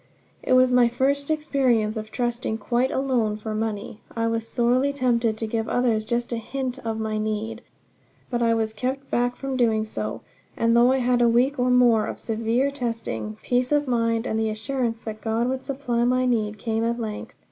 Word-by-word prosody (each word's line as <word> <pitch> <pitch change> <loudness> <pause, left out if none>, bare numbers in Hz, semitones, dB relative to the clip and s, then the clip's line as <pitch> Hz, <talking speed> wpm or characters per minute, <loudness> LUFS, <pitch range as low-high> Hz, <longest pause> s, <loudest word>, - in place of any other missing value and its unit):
It - - 0
was 255 0 +5
my 250 -1 +5
first 275 +4 0
experience 260 -8 +1
of 215 -1 -5
trusting 240 -2 -2
quite 240 +4 0
alone 245 -6 0
for 215 0 -5
money. 215 -1 -4
I 230 0 0
was 230 0 -1
sorely 250 +4 +2
tempted 240 -5 +1
to 225 - -3
give 225 0 -2
others 235 -3 +1
just 235 +2 -1
a - - -1
hint 260 +2 -4
of 225 -2 -3
my 215 -1 -2
need. 215 +2 -3 0.7
But 240 -1 0
I 230 -1 +3
was 220 -1 -1
kept 260 +5 -4
back 245 +1 +1
from 270 -1 -4
doing 225 -3 +2
so; 215 - -4 0.4
and 230 0 +3
though 240 +2 +6
I 265 - +3
had 245 -1 +3
a 235 - +5
week 255 +4 +2
or 250 0 +2
more 240 -3 +4
of - - -6
severe 230 +4 0
testing, 225 - -4
peace 250 +1 +1
of 295 -1 +2
mind 230 -1 +1
and 220 - -1
the 220 0 +1
assurance 230 +1 -2
that 215 -1 -7
God 225 +2 0
would 260 0 -2
supply 255 -4 -1
my 255 +1 +2
need, 215 -4 0
came 225 +1 -1
at 235 +1 -1
length. 215 -2 -5
235 Hz, 200 wpm, -24 LUFS, 220-255 Hz, 0.7 s, though